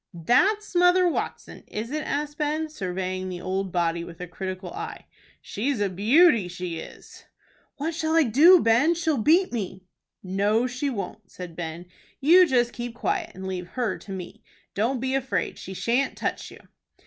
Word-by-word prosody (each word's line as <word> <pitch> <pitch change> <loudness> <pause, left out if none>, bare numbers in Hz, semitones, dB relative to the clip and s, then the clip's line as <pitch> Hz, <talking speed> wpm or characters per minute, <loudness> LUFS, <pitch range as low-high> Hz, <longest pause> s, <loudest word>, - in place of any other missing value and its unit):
"That's 385 - +2
Mother 355 +1 +5
Watson, 340 - -4
is 220 +4 -5
it?" 305 +1 -2
asked 295 +1 -3
Ben, 310 +1 -1
surveying 185 -6 -4
the 180 -1 -5
old 190 +1 -3
body 170 -1 0
with 170 -1 -11
a 180 - -5
critical 185 +1 -6
eye. - - -7 0.4
"She's 250 +4 -2
a 205 -1 +1
beauty, 230 - +4
she 180 -2 -5
is!" - - -12 0.5
"What 315 +3 -2
shall 315 0 -1
I 330 - +6
do, 305 - +7
Ben? 240 +9 +4
She'll 320 -5 0
beat 335 - +3
me." 190 -4 -4 0.4
"No, 200 +5 +1
she 255 +3 -2
won't," 200 -3 -6
said 180 -2 -9
Ben. 170 0 -6 0.3
"You 350 +6 +6
just 245 -4 +2
keep 240 -1 -6
quiet, 350 +5 -1
and 190 - -8
leave 185 -2 -4
her 235 -6 -1
to 200 - -11
me. 190 +3 -7 0.3
Don't 240 +6 0
be 260 +2 -2
afraid. 265 -1 -1
She 190 - -8
shan't 245 +8 0
touch - - -3
you." - - -14
230 Hz, 170 wpm, -25 LUFS, 185-300 Hz, 0.5 s, do